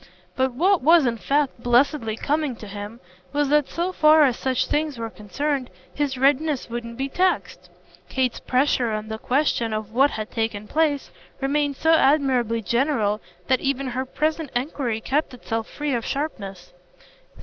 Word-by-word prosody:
But 260 Hz, -1 st, +1 dB
what 365 Hz, +8 st, +3 dB
was 320 Hz, +2 st, +6 dB
in 235 Hz, -2 st, 0 dB
fact 275 Hz, 0 st, 0 dB
blessedly 245 Hz, -1 st, +2 dB
coming 295 Hz, -2 st, -1 dB
to 220 Hz, -, -10 dB
him 205 Hz, +3 st, -8 dB, 0.3 s
was 290 Hz, -1 st, +1 dB
that 295 Hz, -1 st, +3 dB
so 345 Hz, +2 st, -2 dB
far 310 Hz, -2 st, +6 dB
as 260 Hz, -4 st, +3 dB
such 260 Hz, 0 st, 0 dB
things 300 Hz, -3 st, -1 dB
were 230 Hz, -1 st, -5 dB
concerned 270 Hz, +5 st, -3 dB, 0.2 s
his 285 Hz, -3 st, -1 dB
readiness 280 Hz, 0 st, +1 dB
wouldn't 235 Hz, -1 st, -5 dB
be 270 Hz, +1 st, -1 dB
taxed. 365 Hz, +6 st, -1 dB, 0.4 s
Kate's 255 Hz, -2 st, 0 dB
pressure 255 Hz, -2 st, +1 dB
on 215 Hz, 0 st, -4 dB
the 220 Hz, 0 st, -5 dB
question 245 Hz, -4 st, 0 dB
of 215 Hz, 0 st, -4 dB
what 270 Hz, +4 st, +5 dB
had 215 Hz, -4 st, -5 dB
taken 225 Hz, -2 st, -2 dB
place 300 Hz, -1 st, 0 dB, 0.3 s
remained 285 Hz, +1 st, 0 dB
so 320 Hz, +4 st, +3 dB
admirably 265 Hz, -7 st, +3 dB
general 225 Hz, -, +1 dB, 0.2 s
that 260 Hz, -2 st, +2 dB
even 275 Hz, 0 st, -1 dB
her 255 Hz, +1 st, -2 dB
present 310 Hz, +2 st, -1 dB
enquiry 245 Hz, -3 st, -2 dB
kept 280 Hz, +1 st, -1 dB
itself 225 Hz, -2 st, -4 dB
free 295 Hz, -2 st, -3 dB
of 235 Hz, -2 st, -1 dB
sharpness. 200 Hz, -, -5 dB
265 Hz, 160 wpm, -23 LUFS, 230-295 Hz, 0.4 s, was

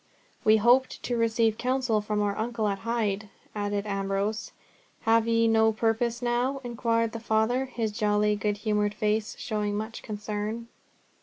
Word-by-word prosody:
"We 215 Hz, 0 st, +6 dB
hoped 245 Hz, +4 st, +3 dB
to 245 Hz, -, -1 dB
receive 225 Hz, -1 st, +2 dB
counsel 255 Hz, -4 st, +1 dB
from 210 Hz, 0 st, -1 dB
our 200 Hz, -1 st, 0 dB
uncle 225 Hz, 0 st, -1 dB
at 200 Hz, -1 st, -1 dB
Hyde," 215 Hz, -2 st, -1 dB, 0.2 s
added 205 Hz, -1 st, -2 dB
Ambrose. 200 Hz, +2 st, -2 dB, 0.5 s
"Have 225 Hz, 0 st, +3 dB
ye 230 Hz, 0 st, +3 dB
no 220 Hz, 0 st, +4 dB
purpose 230 Hz, +2 st, 0 dB
now?" 245 Hz, +3 st, 0 dB
inquired 230 Hz, -1 st, 0 dB
the 230 Hz, -, -5 dB
Father, 225 Hz, +3 st, +1 dB
his 230 Hz, -4 st, -3 dB
jolly 210 Hz, -1 st, +2 dB
good 205 Hz, 0 st, -1 dB
humoured 210 Hz, -1 st, +1 dB
face 215 Hz, 0 st, 0 dB
showing 210 Hz, -2 st, -2 dB
much 220 Hz, +2 st, -5 dB
concern. 215 Hz, +2 st, -4 dB
220 Hz, 150 wpm, -27 LUFS, 210-230 Hz, 0.5 s, We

